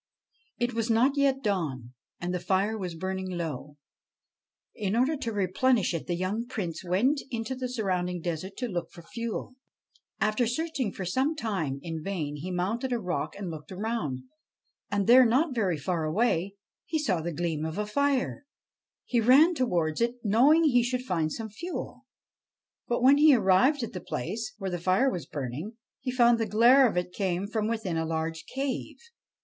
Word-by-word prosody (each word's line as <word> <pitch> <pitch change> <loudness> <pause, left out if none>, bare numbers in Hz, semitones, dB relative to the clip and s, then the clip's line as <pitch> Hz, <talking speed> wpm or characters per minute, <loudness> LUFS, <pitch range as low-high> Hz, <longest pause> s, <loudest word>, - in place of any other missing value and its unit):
It 240 +1 -1
was 230 0 -1
not 245 +5 +3
yet 275 -1 +2
dawn, 145 - -2 0.3
and 175 +1 -3
the 180 - -1
fire 195 +4 +1
was 180 -5 -4
burning 190 +2 -3
low. 155 -5 -5 1.0
In 205 -1 -2
order 260 +6 +2
to 235 -4 -3
replenish 205 +2 +1
it 165 - -4
the 175 - 0
young 200 +7 -2
Prince 180 -10 -4
went 235 +12 +2
into 230 +2 -3
the 255 -1 -4
surrounding 180 -7 -1
desert 175 +3 -4
to 250 - -2
look 175 -6 -3
for 170 - -13
fuel. 230 +7 -5 0.7
After 215 +3 +1
searching 265 -3 -2
for 190 - -6
some 265 - 0
time 185 - -2
in 165 -2 -4
vain, 155 -7 -3
he 165 +6 -6
mounted 205 +9 -1
a 240 - +1
rock 180 -5 -3
and 195 -4 -5
looked 155 +1 -9
around; 185 - -3 0.7
and 200 -1 0
there, 250 +4 +8
not 260 +6 +2
very 195 -9 0
far 165 +3 -2
away, 190 +2 0 0.3
he 320 - 0
saw 200 - 0
the 170 +2 -3
gleam 160 -1 -2
of 160 +2 -4
a 210 - -1
fire. 280 +4 0 0.6
He 240 -2 +1
ran 275 +9 +6
towards 175 - 0
it, 235 +1 +1
knowing 260 +10 +5
he 250 -6 +4
should 250 +1 -2
find 165 -7 0
some 220 +5 -5
fuel. 340 - -7 0.8
But, 240 0 0
when 275 +2 +7
he 300 -2 +7
arrived 235 +7 +3
at 230 - -5
the 180 - -5
place 215 - -4
where 195 -3 -4
the 175 - -3
fire 190 +10 +2
was 175 -7 -5
burning, 150 - -5 0.2
he 260 - -4
found 240 -2 +4
the 225 - 0
glare 240 +6 +6
of 180 - -4
it 180 0 -2
came 190 -1 -1
from 215 +1 -1
within 220 -7 -2
a 160 - 0
large 160 0 -3
cave. 270 -1 -3
205 Hz, 180 wpm, -28 LUFS, 175-245 Hz, 1.0 s, there